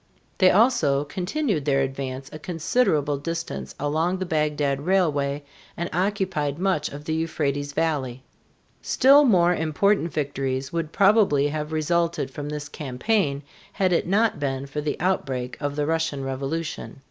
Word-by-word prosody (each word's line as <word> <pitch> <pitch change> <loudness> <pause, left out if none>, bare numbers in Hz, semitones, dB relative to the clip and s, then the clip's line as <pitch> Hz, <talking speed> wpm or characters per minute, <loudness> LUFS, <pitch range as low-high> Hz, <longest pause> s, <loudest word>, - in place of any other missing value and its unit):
They 185 - +7
also 185 - +3
continued 180 - -2
their 135 -2 +2
advance 135 0 -4
a 155 - -7
considerable 155 - 0
distance 165 +3 -5
along 160 +6 0
the 185 - -3
Bagdad 150 -4 0
Railway 150 -6 +1 0.3
and 170 +1 -3
occupied 180 -6 -1
much 185 -3 0
of 145 +1 -9
the 160 - -2
Euphrates 145 -3 -2
valley. 135 -6 -1 0.6
Still 280 +3 +5
more 180 -7 +4
important 170 +3 +1
victories 135 -2 -2
would 165 -2 -2
probably 195 -9 +4
have 150 +1 -4
resulted 160 -2 0
from 145 +1 -6
this 150 -1 -5
campaign 145 - -1 0.3
had 185 -2 +1
it 170 - +1
not 210 -2 +2
been 135 -1 -2
for 140 +2 -4
the 150 0 -3
outbreak 135 -8 -1
of 145 -1 -2
the 145 0 0
Russian 160 -3 -1
revolution. 135 +3 -4
150 Hz, 145 wpm, -24 LUFS, 140-180 Hz, 0.6 s, They